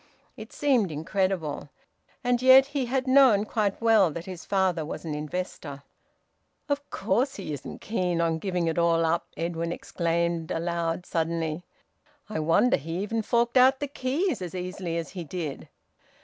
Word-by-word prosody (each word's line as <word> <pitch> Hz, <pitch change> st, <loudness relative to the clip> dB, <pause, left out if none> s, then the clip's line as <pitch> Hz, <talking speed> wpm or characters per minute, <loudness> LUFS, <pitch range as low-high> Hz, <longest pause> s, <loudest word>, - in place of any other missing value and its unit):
It -, -, -10 dB
seemed 250 Hz, -, +1 dB
incredible; 160 Hz, -2 st, -2 dB, 0.5 s
and 245 Hz, 0 st, +1 dB
yet 260 Hz, +1 st, +8 dB
he 280 Hz, -2 st, -2 dB
had 260 Hz, +1 st, 0 dB
known 260 Hz, -6 st, +5 dB
quite 210 Hz, -3 st, -1 dB
well 225 Hz, -5 st, +4 dB
that 170 Hz, +2 st, -7 dB
his 185 Hz, -2 st, -8 dB
father 190 Hz, -4 st, +1 dB
was 155 Hz, -, -6 dB
an 155 Hz, -, -3 dB
investor! 150 Hz, -2 st, -5 dB, 0.8 s
"Of 285 Hz, 0 st, -2 dB
course 230 Hz, +8 st, 0 dB
he 185 Hz, -6 st, -5 dB
isn't 140 Hz, -, -8 dB
keen 180 Hz, -6 st, -1 dB
on 165 Hz, -1 st, +1 dB
giving 180 Hz, -2 st, -1 dB
it 165 Hz, +1 st, 0 dB
all 165 Hz, -1 st, +3 dB
up!" 165 Hz, +1 st, 0 dB
Edwin 170 Hz, 0 st, -2 dB
exclaimed 170 Hz, -1 st, -1 dB
aloud 170 Hz, +1 st, -2 dB
suddenly. 165 Hz, 0 st, -2 dB, 0.6 s
"I 210 Hz, -6 st, -3 dB
wonder 165 Hz, +10 st, +3 dB
he 165 Hz, +3 st, -6 dB
even 225 Hz, +2 st, -1 dB
forked 235 Hz, +3 st, +1 dB
out 260 Hz, +1 st, +6 dB
the 290 Hz, -, -2 dB
keys 275 Hz, -, -1 dB
as 180 Hz, -1 st, -6 dB
easily 180 Hz, -2 st, -4 dB
as 165 Hz, -, -4 dB
he 180 Hz, -3 st, -6 dB
did!" 160 Hz, -3 st, -6 dB
180 Hz, 160 wpm, -27 LUFS, 165-235 Hz, 0.8 s, yet